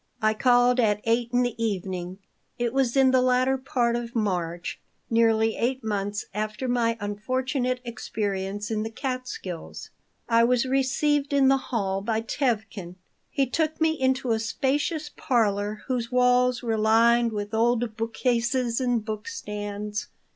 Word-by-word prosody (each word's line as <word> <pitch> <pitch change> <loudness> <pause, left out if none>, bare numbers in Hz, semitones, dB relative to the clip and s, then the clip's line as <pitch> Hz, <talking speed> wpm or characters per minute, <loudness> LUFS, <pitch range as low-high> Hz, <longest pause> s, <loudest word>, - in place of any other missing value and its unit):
I 215 -2 +2
called 245 +2 +4
at 210 -3 +3
8 230 +1 +1
in 245 0 +3
the 230 -1 -2
evening. 185 -3 -3 0.4
It 240 -1 -1
was 270 -1 +1
in 265 -1 +5
the 260 -1 +4
latter 255 +1 +3
part 245 -3 0
of 235 0 -5
March, 175 -6 -2 0.3
nearly 225 -1 +3
eight 255 +2 -1
months 205 -1 -2
after 215 +4 -3
my 235 -2 +1
unfortunate 255 +5 -1
experience 205 -3 -3
in 215 -1 0
the 220 - -3
Catskills. 255 - -6 0.4
I 230 0 +4
was 245 +1 +3
received 275 +2 +1
in 275 -1 +5
the 270 - +5
hall 195 -5 -1
by 220 +1 -1
Tevkin. 220 -7 -2 0.3
He 275 - +1
took 315 +4 -1
me 320 0 +3
into 265 -4 0
a 220 - +2
spacious 290 +6 -1
parlor 210 -3 0
whose 245 -2 -2
walls 250 0 +3
were 225 -2 0
lined 230 +2 +4
with 205 0 -4
old 230 0 +1
book 225 0 -4
cases 245 0 0
and 245 -4 0
book 215 -1 -5
stands. 210 - -5
235 Hz, 150 wpm, -26 LUFS, 215-255 Hz, 0.4 s, in